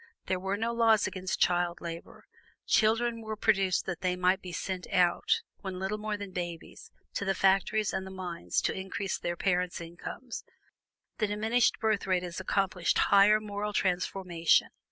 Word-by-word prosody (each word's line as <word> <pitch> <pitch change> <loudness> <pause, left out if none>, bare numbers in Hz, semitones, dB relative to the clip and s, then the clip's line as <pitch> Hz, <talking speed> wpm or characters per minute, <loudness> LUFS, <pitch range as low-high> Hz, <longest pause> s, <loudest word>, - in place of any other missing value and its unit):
There 185 - -1
were 195 +2 -2
no 230 +2 -1
laws 225 -2 +4
against 185 0 -3
child 175 -1 +2
labor; 170 -1 -8 0.4
children 230 +1 +2
were 220 -1 -4
produced 195 -3 +2
that 175 -3 -4
they 180 -1 +1
might 185 +2 +2
be 180 - -7
sent 185 +1 -4
out, 180 -2 +2 0.2
when 190 -2 -5
little 190 +3 -2
more 210 0 -2
than 200 -2 -7
babies, 175 -2 -6 0.2
to - - -2
the 195 -1 0
factories 195 +3 +2
and 190 - -2
the 190 - -8
mines 185 -3 -3
to - - 0
increase 190 0 -3
their 175 0 -3
parents' 180 -2 0
incomes. 175 +8 -7 0.8
The 215 - +2
diminished 220 +4 +1
birth 215 -3 0
rate 185 -1 +1
has 175 0 -5
accomplished 190 -2 0 0.2
higher 205 +2 +7
moral 210 0 -4
transformation. 180 -3 +1
190 Hz, 165 wpm, -30 LUFS, 180-210 Hz, 0.8 s, higher